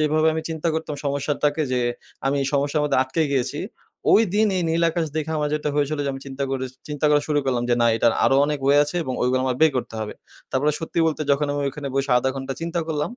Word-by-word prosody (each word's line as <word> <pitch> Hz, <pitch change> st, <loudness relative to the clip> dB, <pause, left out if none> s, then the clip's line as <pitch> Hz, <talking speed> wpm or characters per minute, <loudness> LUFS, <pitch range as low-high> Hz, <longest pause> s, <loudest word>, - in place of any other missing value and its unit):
যেভাবে 155 Hz, +1 st, +3 dB
আমি 160 Hz, -, -2 dB
চিন্তা 160 Hz, +1 st, -2 dB
করতাম 160 Hz, -1 st, -3 dB
সমস্যাটাকে 145 Hz, +2 st, 0 dB
যে, 125 Hz, -, +1 dB, 0.5 s
আমি 140 Hz, +1 st, +1 dB
এই -, -, -1 dB
সমস্যার 145 Hz, +2 st, +1 dB
মধ্যে 145 Hz, -, +2 dB
আটকে 130 Hz, +5 st, -1 dB
গিয়েছি। 135 Hz, +2 st, -1 dB, 0.5 s
ওইদিন 215 Hz, 0 st, +4 dB
এই 180 Hz, -, 0 dB
নীল 165 Hz, +1 st, +1 dB
আকাশ 165 Hz, -1 st, -1 dB
দেখে 155 Hz, 0 st, -2 dB
আমার 150 Hz, 0 st, 0 dB
যেটা 150 Hz, 0 st, -1 dB
হয়েছিল 145 Hz, +1 st, 0 dB
যে 140 Hz, -, 0 dB
আমি 135 Hz, -, -7 dB
চিন্তা 135 Hz, 0 st, -3 dB
করে 135 Hz, -1 st, -2 dB
স -, -, -24 dB, 0.2 s
চিন্তা 150 Hz, 0 st, -4 dB
করা 145 Hz, 0 st, +5 dB
শুরু 150 Hz, -1 st, +2 dB
করলাম, 125 Hz, -3 st, 0 dB
যে -, -, +5 dB
না -, -, +5 dB
এটার 115 Hz, 0 st, +3 dB
আরো 135 Hz, -, +4 dB
অনেক 150 Hz, 0 st, -1 dB
ওয়ে 140 Hz, +1 st, +5 dB
আছে। 150 Hz, +4 st, -5 dB
এবং 130 Hz, -, -3 dB
ওয়ে 125 Hz, -, +2 dB
গুলো 130 Hz, -, +2 dB
আমার 130 Hz, -1 st, 0 dB
বের 160 Hz, -, +7 dB
করতে 120 Hz, -, -3 dB
হবে। 105 Hz, -1 st, -5 dB, 0.4 s
তারপরে 145 Hz, +3 st, +1 dB
সত্যি 165 Hz, +1 st, -4 dB
বলতে 155 Hz, -1 st, -1 dB
যখন 145 Hz, +1 st, +1 dB
আমি 145 Hz, -, -2 dB
ওইখানে 140 Hz, +1 st, -5 dB
বসে 135 Hz, 0 st, 0 dB
০.৫ 130 Hz, +2 st, 0 dB
ঘন্টা 135 Hz, 0 st, -4 dB
চিন্তা 170 Hz, +1 st, -2 dB
করলাম, 150 Hz, -2 st, -1 dB
145 Hz, 245 wpm, -23 LUFS, 135-155 Hz, 0.5 s, বের